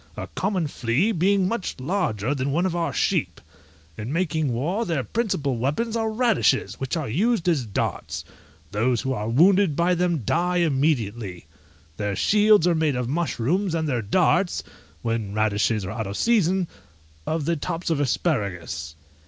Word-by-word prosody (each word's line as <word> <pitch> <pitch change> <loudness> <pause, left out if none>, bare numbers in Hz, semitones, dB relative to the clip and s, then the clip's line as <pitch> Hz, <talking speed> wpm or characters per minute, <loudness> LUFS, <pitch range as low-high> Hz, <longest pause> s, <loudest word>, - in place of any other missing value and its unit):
a - - -4
common 190 -4 0
flea 140 - 0
being 195 0 +2
much 230 -1 -3
larger 130 - -1
than 135 0 -2
one 170 +6 +1
of 180 -2 -1
our 170 -1 0
sheep: - - 0 0.6
in 110 +4 -4
making 160 -4 0
war, 165 - -1
their 165 - -1
principal 155 - -1
weapons 150 - -1
are 225 -1 0
radishes, 220 - +1
which 135 +5 -2
are 155 - -3
used 195 - +1
as 145 -9 +1
darts: 100 - -3 0.5
those 115 +3 +1
who 130 - -1
are 105 -2 -3
wounded 180 +5 +4
by 170 +3 +2
them 175 -6 0
die 180 - +1
immediately. 120 - 0 0.5
Their 105 -1 -2
shields 210 - +4
are 175 - +4
made 160 -4 +1
of 125 -1 -2
mushrooms, 165 - 0
and 160 -1 -1
their 125 -5 0
darts 175 - +2 0.4
(when 115 -3 -2
radishes 110 -1 +1
are 95 - -4
out 110 -2 -4
of 100 - -5
season) 190 -6 +2 0.6
of 160 -2 -1
the 170 +1 +1
tops 165 +3 -3
of 155 - +1
asparagus. 95 - -2
155 Hz, 160 wpm, -24 LUFS, 115-180 Hz, 0.6 s, wounded